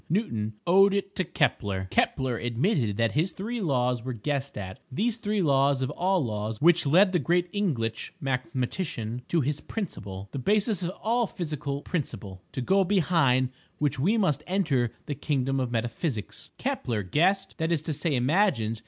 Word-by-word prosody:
Newton 115 - -1
owed 195 +3 +5
it 195 0 -2
to 185 - +2
Kepler. 100 - 0
Kepler 130 -2 +1
admitted 120 - 0
that 115 -1 +2
his 165 +4 +1
three 230 +4 -4
laws 125 - +1
were 130 0 -3
guessed 140 +4 -3
at—these 130 - -3
three 210 -3 0
laws 140 -2 +3
of 130 - -2
all 180 -1 +1
laws 105 0 -3
which 170 -1 +4
led 185 +7 +5
the 180 - +2
great 175 +4 +1
Inglitch 125 - -1
mathematician 130 - -2
to 170 - +2
his 145 +2 -1
principle, 100 - -6
the 140 - -4
basis 205 - +1
of 175 - -1
all 235 +1 +2
physical 150 -5 -4
principle—to 125 - -5
go 195 +9 +3
behind 160 -9 +3 0.3
which 145 -3 0
we 200 - +3
must 155 -8 +1
enter 140 - +1
the 150 - -3
Kingdom 135 -1 -1
of 130 -2 -1
Metaphysics: 115 - -3
Kepler 110 -4 -2
guessed—that 170 - +1
is 160 -3 +1
to 160 - -2
say 150 0 0
imagined. 125 - +2
145 Hz, 160 wpm, -27 LUFS, 125-185 Hz, 0.3 s, owed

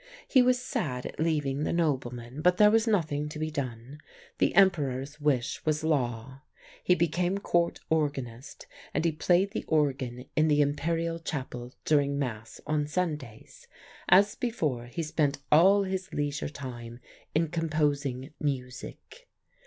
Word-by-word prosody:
"He 260 - +5
was 250 0 +3
sad 130 - -3
at - - -7
leaving 150 -4 0
the - - -1
nobleman, 130 -5 -2
but 180 +2 +4
there 210 0 +7
was 225 +1 +3
nothing 155 -8 0
to 150 - -7
be 155 0 -2
done. 135 0 -5 0.4
The - - +2
Emperor's 150 -6 +2
wish 140 -3 0
was 155 0 0
law. 130 -4 -1 0.4
He 180 - +4
became 175 +3 0
Court 175 -3 0
organist 140 -6 -2 0.3
and - - +1
he 165 - +3
played 180 +5 +2
the 225 - -3
organ 135 -5 0
in 155 0 +3
the 150 -1 +3
Imperial 165 +3 0
chapel 130 -5 -5
during 140 -2 +2
Mass 115 -5 -4
on 150 -1 0
Sundays. 150 -9 -4 0.4
As 200 +3 +6
before, 150 - -2
he 165 +7 -4
spent 150 -2 0
all 190 +6 +6
his 190 -1 -4
leisure 145 -1 -2
time 120 -4 -8 0.4
in 160 0 +2
composing 145 -5 -1
music. 140 - -5
150 Hz, 145 wpm, -28 LUFS, 135-170 Hz, 0.4 s, there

